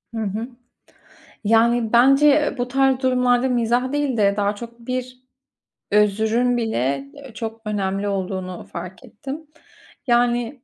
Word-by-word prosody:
Hı 225 - -2
hı. 215 +4 -3 1.0
Yani, 230 +1 +2
bence, 275 +5 +6
eee, 295 0 +3
bu 245 0 -2
tarz 265 0 +2
durumlarda 250 -1 +2
mizah 245 +2 +1
değil 290 -4 -1
de 200 -1 +3
daha 205 0 0
çok 235 +2 -10
bir 255 +1 -5 0.7
özrün 220 +4 +2
bile, 140 - -1
eee, 270 -4 -12
çok 225 +1 -6
önemli 200 -1 -2
olduğunu 185 -2 -4
fark 185 +8 -9
ettim. 275 +6 -8 0.6
Yani 240 +1 +1
235 Hz, 130 wpm, -21 LUFS, 210-255 Hz, 1.0 s, bence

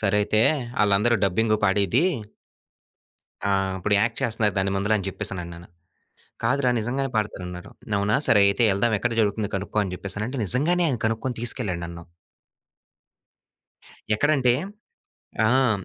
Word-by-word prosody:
సరే 105 -1 +1
అయితే, 110 +1 +2 0.4
ఆళ్ళందరూ 105 +3 +3
డబ్బింగు 110 +3 +1
పాడేది. 100 - +2 1.4
ఆ! - - +2 0.3
ఇప్పుడు 105 +3 -1
యాక్ట్ 115 +2 0
చేస్తున్నారు 110 -3 0
దాని 95 0 0
ముందుల 100 +2 +1
అని 100 - -5
జేప్పేసనన్నాను. 90 -4 -5 0.8
కాదురా 130 +2 +2
నిజంగానే 130 +5 -2
పాడతారన్నారు. 95 -3 -4 0.3
అవునా! 100 +2 +1
సరే 105 - +5
అయితే 100 +4 +1
యెళ్దాం 110 +4 +1
ఎక్కడ 120 +3 -1
జరుగుతుంది 105 0 -1
కనుక్కో 100 +2 -4
అని 95 - -5
జెప్పేసనంటే, 105 +7 -5
నిజంగానే 160 - +1
ఆయన 125 -5 -2
కనుక్కోని 115 +3 -2
తీసుకెళ్ళాడు 110 -7 -1
నన్ను. 85 0 -9 2.1
ఎక్కడంటే? 135 -1 +2 0.9
ఆ! - - +3
హ్మ్. 120 -6 +2
105 Hz, 125 wpm, -24 LUFS, 100-120 Hz, 2.1 s, సరే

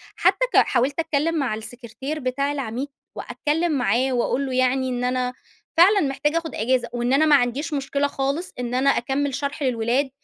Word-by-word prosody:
حتّى - - +3
ك - - +4
حاولت 275 +6 +2
أتكلّم 320 0 0
مع 255 -6 0
السكرتير 245 +6 -6
بتاع 275 +2 -1
العميد، 265 -1 -3 0.3
وأتكلّم 325 +3 -1
معاه 260 -1 +1
واقول 250 +3 0
له 260 - -4
يعني 255 +1 +1
إن 245 0 -2
أنا 250 0 0 0.4
فعلًا 395 +4 +6
محتاجة 295 +3 0
آخُد 330 -1 -4
أجازة 250 +3 0
وإن 240 +2 0
أنا 310 +3 +4
ما 295 -2 +6
عنديش 275 +5 0
مشكلة 280 0 0
خالص 280 +5 -2
إن 245 0 -3
أنا 270 +2 +3
أكمّل 270 +2 0
شرح 285 +1 -3
للولاد 250 +2 +1
270 Hz, 175 wpm, -23 LUFS, 250-290 Hz, 0.4 s, فعلًا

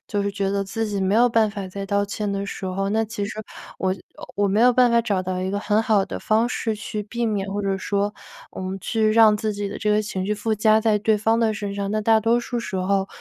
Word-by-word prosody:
就 205 -2 -1
是 200 - -1
觉 200 -1 -1
得 200 0 -1
自 225 +3 -3
己 205 -1 -3
没 190 +1 +1
有 240 +2 +5
办 225 -2 +2
法 200 -2 -6
再 195 +1 -6
道 200 0 +1
歉 205 0 -3
的 200 0 -3
时 195 - -6
候， 190 +1 -2
那 220 +2 +1
其 205 -2 -4
实 200 - -6 0.5
我 190 0 0 0.4
我 205 0 +1
没 205 +3 +2
有 250 0 +6
办 250 -1 +4
法 235 - +4
找 200 -4 0
到 185 0 -3
一 185 - -2
个 200 +1 -2
很 210 +1 +1
好 210 -3 +2
的 - - -5
方 225 +2 +1
式 225 -3 -2
去 210 0 -5
避 235 +3 -3
免， 205 -3 -1
或 205 - -2
者 195 -1 -1
说 200 +2 -1 0.4
我 - - -7
们 190 +1 -4
去 215 +1 +1
让 220 -2 +6
自 215 0 -2
己 205 0 -3
的 - - -6
这 210 -1 0
个 210 - +3
情 195 -3 -4
绪 210 - 0
附 215 +1 -1
加 215 +1 +4
在 215 -2 +2
对 215 0 +2
方 225 +2 +2
的 225 -2 +2
身 205 -1 -4
上。 200 0 -3
那 215 - 0
大 220 +1 +4
多 230 +2 +2
数 240 0 -4
时 230 -4 -4
候， 195 +1 0
210 Hz, 295 characters per minute, -23 LUFS, 195-220 Hz, 0.5 s, 有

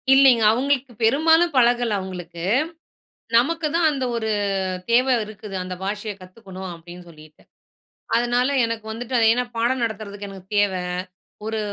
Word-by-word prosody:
இல்லிங்க. 265 -4 +6
அவுங்களுக்கு 265 +2 0
பெரும்பாலும் 320 +8 +4
பழகல 240 -3 +3
அவுங்களுக்கு. 175 -3 -7 0.9
நமக்கு 315 +7 +2
தான் 335 -1 +3
அந்த 275 -3 -2
ஒரு 220 -1 -2 0.6
தேவ 245 +2 +4 0.2
இருக்குது, 210 -1 -10
அந்த 185 0 -5
பாஷைய 205 +2 -3
கத்துக்கணும் 185 0 -9
அப்டின் 175 +1 -12
சொல்லிட்டு. 155 -2 -16 0.7
அதனால 240 +2 +1 0.2
எனக்கு 230 -1 -3
வந்துட்டு 240 +3 -5
அது 225 - +4
ஏன்னா 250 +2 0
பாடம் 240 +2 +1
நடத்துறதுக்கு 205 -2 -5
எனக்கு 190 -2 -11
தேவ. 205 -1 +3 0.7
ஒரு 220 0 -2
225 Hz, 135 wpm, -22 LUFS, 195-250 Hz, 0.9 s, இல்லிங்க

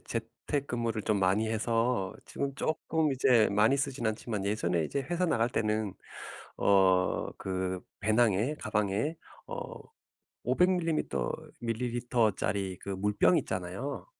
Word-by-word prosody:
재택근무를 115 0 -3
좀 105 -1 +1
많이 100 +4 +2
해서 115 -2 0
지금 140 -1 -3
쪼끔 155 +1 0
이제 125 -4 +4
많이 105 +6 +4
쓰진 135 -3 -1
않지만 110 -2 -2
예전에 90 -5 0
이제 140 - -2
회사 175 +6 -1
나갈 120 -9 +2
때는 110 -4 -1 0.6
어 95 -2 +3
그 95 -1 -2 0.2
배낭에 110 +4 +2
가방에 105 +9 0 0.3
어 485 - -5 0.9
500 180 +1 +3
밀리미터 165 -4 0 0.3
밀리리터짜리 115 -5 0
그 100 - -6
물병 105 - +3
있잖아요. 95 - -4
110 Hz, 255 characters per minute, -30 LUFS, 100-130 Hz, 0.9 s, 이제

